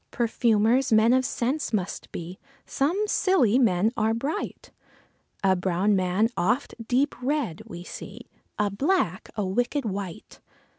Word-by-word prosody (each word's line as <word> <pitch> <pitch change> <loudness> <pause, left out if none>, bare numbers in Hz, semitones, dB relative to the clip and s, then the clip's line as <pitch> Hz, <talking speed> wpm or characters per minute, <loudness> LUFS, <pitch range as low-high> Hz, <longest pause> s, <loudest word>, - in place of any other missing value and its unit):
Perfumers, 230 +1 +2
men 220 +2 +5
of 260 0 +3
scents 260 +4 -1
must 195 -4 -3
be, 175 +2 -7 0.3
some 335 +10 0
Scilly 275 - +3
men 215 -3 +3
are 220 +1 +1
bright; 285 - -4 0.7
A 190 -1 +4
brown 185 +3 +1
man 185 +3 +2
oft 240 +10 0
deep 270 +4 +2
read 260 - -1
we 175 0 -8
see, - - -9 0.4
a 205 -1 +1
black 265 - 0
a 210 - -1
wicked 245 +8 -1
wight. 195 -4 -6
225 Hz, 135 wpm, -26 LUFS, 190-260 Hz, 0.7 s, men